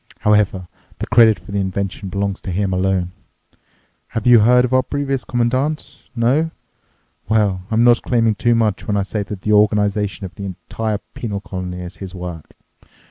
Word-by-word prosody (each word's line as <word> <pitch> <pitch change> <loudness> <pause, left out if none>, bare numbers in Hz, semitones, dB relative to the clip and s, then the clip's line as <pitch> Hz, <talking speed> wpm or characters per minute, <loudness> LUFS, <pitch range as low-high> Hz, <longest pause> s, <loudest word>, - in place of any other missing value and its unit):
However, 105 -3 +2 0.3
the - - -4
credit 110 -2 +5
for - - -13
the 100 - -1
invention 95 0 -3
belongs 100 0 -2
to 95 - -5
him 95 +1 -1
alone. 90 -1 0 1.0
Have 115 - -4
you 120 -2 +7
heard 125 +3 +5
of 125 - -3
our 130 - +5
previous 135 -1 -2
Commandant? 130 +5 -2
No? 130 +8 +2 0.8
Well, 105 -4 +2
I'm 115 0 +2
not 120 -1 +5
claiming 115 -3 +2
too 120 +3 +2
much 110 -3 0
when 105 - +1
I 100 - +1
say 105 +2 -3
that 100 -1 -6
the 105 - +1
organization 105 -1 +2
of 90 - -9
the 100 - -7
entire 100 +4 -3 0.2
penal 105 -4 -4
colony 90 -2 -6
is 90 -1 -8
his 95 -2 -8
work. 90 -3 -7
105 Hz, 175 wpm, -19 LUFS, 95-115 Hz, 1.0 s, you